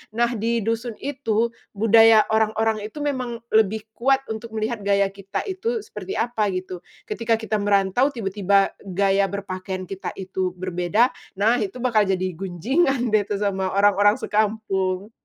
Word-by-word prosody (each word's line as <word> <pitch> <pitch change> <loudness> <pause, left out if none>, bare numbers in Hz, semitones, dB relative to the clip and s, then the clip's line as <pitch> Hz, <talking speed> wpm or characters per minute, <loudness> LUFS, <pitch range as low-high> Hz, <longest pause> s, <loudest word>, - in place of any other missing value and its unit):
Nah, 235 +1 +2
di 230 0 -1
dusun 230 +1 -2
itu 235 -5 0 0.2
budaya 225 +1 +6
orang-orang 220 0 +1
itu 290 +7 -7
memang 250 -5 -3
lebih 220 0 +2
kuat 270 +4 +1
untuk 220 +1 -6
melihat 220 +1 -2
gaya 200 -1 +3
kita 195 0 -5
itu 440 +4 -3
seperti 425 -3 -7
apa 225 -3 0
gitu. 185 0 -5 0.2
Ketika 230 +1 0
kita 220 -1 -2
merantau 200 +4 +2
tiba-tiba 200 -6 +1 0.2
gaya 195 +1 +2
berpakaian 190 -1 -5
kita 190 +1 -6
itu 185 -1 -3
berbeda. 185 +6 +1 0.2
Nah 220 +5 +2
itu 205 -1 -3
bakal 220 -5 +3
jadi 185 -1 0
gunjingan 235 - 0
deh 210 -2 +2
tuh 205 - -2
sama 195 -2 -1
orang-orang 205 +1 +4
sekampung. 205 -3 -1
215 Hz, 145 wpm, -23 LUFS, 195-230 Hz, 0.2 s, budaya